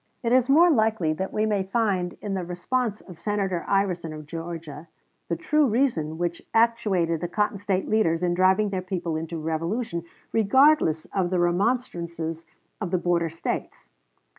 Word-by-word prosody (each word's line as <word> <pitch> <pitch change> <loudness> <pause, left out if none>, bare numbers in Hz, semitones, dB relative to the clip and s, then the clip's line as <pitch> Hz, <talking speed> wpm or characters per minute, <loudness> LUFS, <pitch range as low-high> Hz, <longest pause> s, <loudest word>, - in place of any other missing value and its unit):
It 230 - 0
is 255 0 +4
more 335 +5 +6
likely 220 - +2
that 190 +5 -4
we 215 - 0
may 210 -2 +1
find 190 -3 -1
in 205 - -3
the 190 -2 -2
response 210 +6 -2
of 180 -4 -13
Senator 195 -4 -1
Iverson, 180 -5 0
of 155 -1 -8
Georgia, 165 -1 -7 0.4
the 170 - +1
true 295 - +2
reason 210 - 0
which 170 0 -2
actuated 205 -8 +2
the 175 - -1
Cotton 210 +2 -1
State 195 -1 -1
leaders 180 -6 +2
in 175 -1 +2
driving 190 +3 +3
their 190 -2 -1
people 180 -3 -3
into 165 +1 -4
revolution, 165 +4 -2 0.3
regardless 225 - +4
of 185 -3 +1
the 185 - 0
remonstrances 175 -4 -1 0.3
of 190 - -2
the 185 - +1
border 170 -1 +1
States. 165 +1 -5
185 Hz, 165 wpm, -25 LUFS, 170-215 Hz, 0.4 s, more